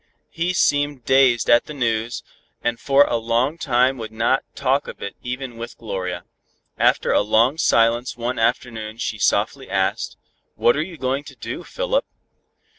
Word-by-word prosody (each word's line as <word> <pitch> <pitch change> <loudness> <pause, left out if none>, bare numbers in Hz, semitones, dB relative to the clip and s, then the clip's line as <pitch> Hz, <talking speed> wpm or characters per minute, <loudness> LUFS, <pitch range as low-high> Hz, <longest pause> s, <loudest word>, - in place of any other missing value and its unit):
He 170 +2 -1
seemed 145 -6 +1
dazed 130 -3 +4
at 120 0 +5
the 150 - -8
news, 115 -2 -1 0.4
and 120 0 -1
for 140 0 +5
a 120 - 0
long 120 +7 0
time 130 -1 +2
would 110 -1 -6
not 115 +4 +1
talk 135 +1 +1
of - - -8
it 100 - -6
even 125 -1 -5
with 115 +1 -8
Gloria. 95 -5 -4 0.5
After - - +2
a - - +4
long 115 +8 +2
silence 115 -3 +2
one 120 +1 -2
afternoon 115 -1 -1
she 110 -2 -3
softly 120 +7 0
asked, 95 0 -1 0.4
"What 120 - +3
are 150 - 0
you 170 +1 -6
going 135 +1 -1
to - - -11
do, - - -6
Philip?" - - -1
120 Hz, 165 wpm, -22 LUFS, 115-140 Hz, 0.5 s, at